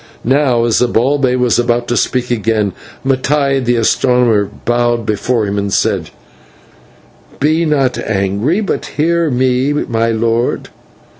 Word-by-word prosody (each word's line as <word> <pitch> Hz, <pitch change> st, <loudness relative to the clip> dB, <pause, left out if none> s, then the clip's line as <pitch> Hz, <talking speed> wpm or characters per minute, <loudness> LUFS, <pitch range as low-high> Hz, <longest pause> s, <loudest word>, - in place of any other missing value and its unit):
Now, 130 Hz, -2 st, +2 dB
as 115 Hz, -, +2 dB
Zibalbay 125 Hz, +2 st, +1 dB
was 125 Hz, -1 st, +2 dB
about 120 Hz, 0 st, 0 dB
to 120 Hz, -, 0 dB
speak 125 Hz, 0 st, -1 dB
again, 110 Hz, -3 st, 0 dB, 0.3 s
Mattai 135 Hz, 0 st, +1 dB
the 120 Hz, 0 st, +1 dB
astronomer 115 Hz, -2 st, +2 dB, 0.2 s
bowed 120 Hz, -1 st, 0 dB
before 110 Hz, +2 st, 0 dB
him 100 Hz, 0 st, -2 dB
and 100 Hz, 0 st, -3 dB
said: -, -, 0 dB, 1.3 s
"Be 155 Hz, +3 st, +1 dB
not 140 Hz, -4 st, 0 dB
angry, 105 Hz, -, -1 dB
but 205 Hz, -, -3 dB
hear 165 Hz, +1 st, +1 dB
me, 130 Hz, +2 st, +1 dB
my 115 Hz, -5 st, -1 dB
lord. 115 Hz, +1 st, -1 dB
120 Hz, 130 wpm, -14 LUFS, 115-135 Hz, 1.3 s, Now